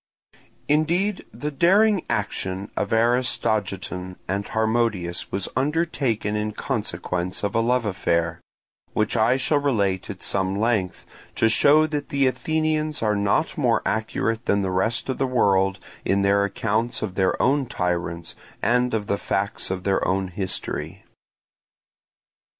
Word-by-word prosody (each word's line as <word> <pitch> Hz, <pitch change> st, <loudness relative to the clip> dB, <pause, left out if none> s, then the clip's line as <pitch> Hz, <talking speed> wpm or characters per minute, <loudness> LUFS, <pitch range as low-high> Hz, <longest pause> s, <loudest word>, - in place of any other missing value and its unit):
Indeed, 170 Hz, +7 st, +1 dB
the 150 Hz, +1 st, -4 dB
daring 195 Hz, +6 st, +4 dB
action 100 Hz, -3 st, -2 dB
of -, -, -1 dB
Aristogiton 110 Hz, -6 st, 0 dB
and 100 Hz, +2 st, -2 dB
Harmodius 110 Hz, -6 st, 0 dB
was 95 Hz, 0 st, 0 dB
undertaken 135 Hz, -7 st, 0 dB
in 105 Hz, 0 st, -2 dB
consequence 90 Hz, -1 st, -2 dB
of 100 Hz, -, -1 dB
a 115 Hz, -, +2 dB
love 120 Hz, +1 st, +1 dB
affair, 85 Hz, -3 st, 0 dB, 0.5 s
which 110 Hz, 0 st, 0 dB
I 120 Hz, +4 st, +3 dB
shall 145 Hz, +2 st, +2 dB
relate 100 Hz, -10 st, 0 dB
at 100 Hz, -3 st, -7 dB
some 95 Hz, 0 st, 0 dB
length, 110 Hz, -4 st, 0 dB, 0.3 s
to 115 Hz, -, +3 dB
show 145 Hz, +8 st, +5 dB
that 150 Hz, -2 st, -3 dB
the 140 Hz, -1 st, +2 dB
Athenians 155 Hz, +1 st, 0 dB
are 105 Hz, -1 st, +2 dB
not 100 Hz, +12 st, 0 dB
more 120 Hz, -5 st, +2 dB
accurate 110 Hz, +1 st, -1 dB
than 100 Hz, 0 st, +2 dB
the 95 Hz, -, -1 dB
rest 105 Hz, +5 st, 0 dB
of 130 Hz, -, -3 dB
the 135 Hz, -, +1 dB
world 95 Hz, -6 st, +2 dB, 0.3 s
in 100 Hz, +1 st, +1 dB
their 100 Hz, 0 st, +3 dB
accounts 110 Hz, +4 st, -1 dB
of 100 Hz, -4 st, -3 dB
their 95 Hz, -1 st, +1 dB
own 135 Hz, 0 st, +2 dB
tyrants 85 Hz, -3 st, -2 dB, 0.3 s
and 125 Hz, +2 st, +2 dB
of 105 Hz, -2 st, -2 dB
the 100 Hz, 0 st, -1 dB
facts 100 Hz, +1 st, -2 dB
of 95 Hz, -1 st, -3 dB
their 95 Hz, 0 st, +1 dB
own 95 Hz, 0 st, 0 dB
history. 95 Hz, +1 st, -4 dB
110 Hz, 140 wpm, -24 LUFS, 95-130 Hz, 0.5 s, show